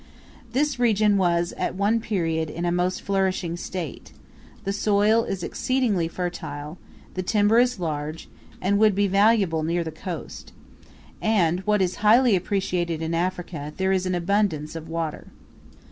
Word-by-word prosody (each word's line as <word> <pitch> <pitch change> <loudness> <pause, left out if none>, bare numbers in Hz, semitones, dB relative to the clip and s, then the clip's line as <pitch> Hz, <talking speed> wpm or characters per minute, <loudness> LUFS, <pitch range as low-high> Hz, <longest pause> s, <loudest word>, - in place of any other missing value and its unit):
This 280 -1 +1
region 215 -3 +3
was 175 -2 +1
at - - -2
one 205 +4 +2
period 165 -7 -1
in 170 +3 -4
a 175 - +1
most 180 +1 0
flourishing 190 -3 0
state; 175 -4 -6 0.5
the 195 - -2
soil 210 +2 +3
is 185 -2 -4
exceedingly 230 -10 0
fertile; 165 -3 -5 0.3
the 185 - -2
timber 210 +4 +3
is 245 -3 +2
large, 155 -1 -4 0.3
and 200 +2 +1
would 215 -2 +4
be 205 +1 +2
valuable 195 -4 +3
near 170 +2 0
the 160 - -5
coast; 175 +2 -7 0.7
and, 180 -6 +2
what 210 -2 +3
is 180 0 -2
highly 225 +2 +5
appreciated 175 -3 -1
in 160 +1 -2
Africa, 170 -3 -3
there 190 0 +1
is 185 -1 +1
an 185 - 0
abundance 175 -4 0
of 165 0 -7
water. 165 -2 -4
185 Hz, 150 wpm, -24 LUFS, 165-205 Hz, 0.7 s, highly